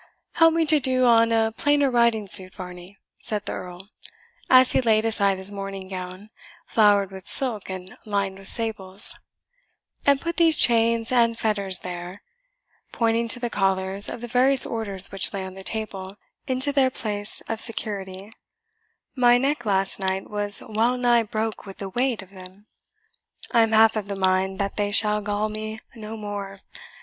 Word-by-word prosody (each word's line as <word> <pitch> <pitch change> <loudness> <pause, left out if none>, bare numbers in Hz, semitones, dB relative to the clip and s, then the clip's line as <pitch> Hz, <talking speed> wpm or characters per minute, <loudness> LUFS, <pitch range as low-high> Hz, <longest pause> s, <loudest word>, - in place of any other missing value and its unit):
"Help 330 -1 +3
me 330 -1 +1
to 305 0 +3
do 255 -1 0
on 230 -1 +3
a 225 -1 +1
plainer 290 0 +1
riding 235 -3 +1
suit, 190 -1 +4
Varney," 180 +1 -11 0.2
said 210 -1 -2
the - - -4
Earl, 180 +2 -9 0.6
as 255 0 +5
he - - +1
laid 220 -2 +1
aside 200 -3 0
his 190 +2 -2
morning 195 -1 -7
gown, 185 +2 -9 0.3
flowered 205 -3 +2
with 190 -1 -12
silk 235 -8 -2
and 185 0 -8
lined 200 -2 -3
with 195 - -13
sables, 205 -4 +3 0.9
"and 280 -1 +2
put 335 +3 -5
these 330 -3 +5
chains 230 0 +4
and 230 -2 +2
fetters 200 -5 0
there" 180 +1 -8 0.7
(pointing 230 0 -1
to 245 - 0
the 240 -1 -4
collars 195 0 -1
of 235 - -8
the 240 - -7
various 255 +2 +5
Orders 200 -4 -5
which 195 -1 +2
lay 190 -1 -5
on 185 - -9
the 190 0 -11
table) 195 -3 -6 0.3
"into 260 +2 +1
their 275 -2 +2
place 210 -3 -2
of 225 -1 -1
security 200 -3 +2 0.8
my 245 -2 +4
neck 270 -2 -2
last 195 -1 -1
night 190 0 -3
was 205 -1 +1
well 230 +3 0
nigh 240 -1 +2
broke 220 -1 -5
with 195 - -11
the 195 - -7
weight 245 0 -2
of 190 - -20
them. 190 +1 -15 0.9
I 235 - +3
am 225 0 +1
half 220 0 +4
of 210 -2 -4
the 200 - -5
mind 190 0 -1
that 200 -1 -4
they 205 -1 -1
shall 210 0 +2
gall 205 +1 -2
me 215 +1 -7 0.2
no 220 0 -9
more. 200 -2 -7
210 Hz, 175 wpm, -23 LUFS, 195-235 Hz, 0.9 s, as